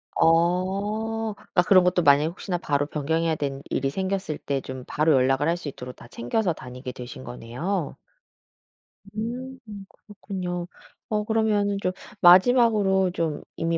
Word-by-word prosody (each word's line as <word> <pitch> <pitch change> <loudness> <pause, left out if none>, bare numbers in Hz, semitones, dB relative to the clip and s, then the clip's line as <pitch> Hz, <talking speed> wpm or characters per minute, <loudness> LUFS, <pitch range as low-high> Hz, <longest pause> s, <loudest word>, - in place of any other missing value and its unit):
어 200 +6 +1
그러니까 180 - 0
그런 185 0 +6
것도 180 0 +2
만약에 145 -1 +5
혹시나 175 +1 -4
바로 145 -3 0
변경해야 160 +2 -1
되는 140 -2 -3
일이 135 +1 0
생겼을 190 0 -2
때 140 -2 -2
좀 130 -1 -7
바로 155 +1 +2
연락을 135 +3 +2
할 170 +1 +1
수 175 - -8
있도록 125 -2 -7
다 - - -14
챙겨서 170 - -1
다니게 125 -3 -8
되신 125 0 -9
거네요. 140 +9 -4 1.2
음 250 +4 -5 0.3
그렇군요. 185 -4 -6 0.4
어 210 -1 0
그러면은 210 -2 +1
좀 185 - 0 0.3
마지막으로 190 -1 +5
좀 165 -4 -2
이미 165 0 -1
175 Hz, 310 characters per minute, -25 LUFS, 145-200 Hz, 1.2 s, 그런